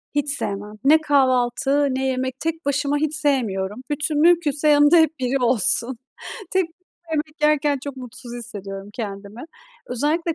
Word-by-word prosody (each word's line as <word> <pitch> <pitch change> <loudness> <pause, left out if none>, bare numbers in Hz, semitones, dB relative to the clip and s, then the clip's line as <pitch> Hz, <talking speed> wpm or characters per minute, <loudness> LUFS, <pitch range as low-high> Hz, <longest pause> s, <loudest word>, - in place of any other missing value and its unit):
Hiç 290 0 0
sevmem. 205 +1 -5
Ne 310 +3 +5
kahvaltı, 270 0 +2
ne 265 0 -2
yemek 260 0 -3
tek 325 0 -4
başıma 285 +1 0
hiç 310 0 0
sevmiyorum. 230 -8 -1
Bütün, 295 0 -1
mümkünse, 315 -3 +3
yanımda 295 +3 +6
hep 320 -1 +2
biri 260 +1 0
olsun. 240 +1 +3 0.5
Tek 375 0 +2
başıma 330 0 -15 0.4
yemek 305 +1 -4
yerken 300 -1 +2
çok 280 -2 -6
mutsuz 250 -1 -9
hissediyorum 200 -4 -8
kendimi. 205 +1 -7 0.4
Özellikle 305 +7 -1
275 Hz, 145 wpm, -21 LUFS, 240-300 Hz, 0.5 s, yanımda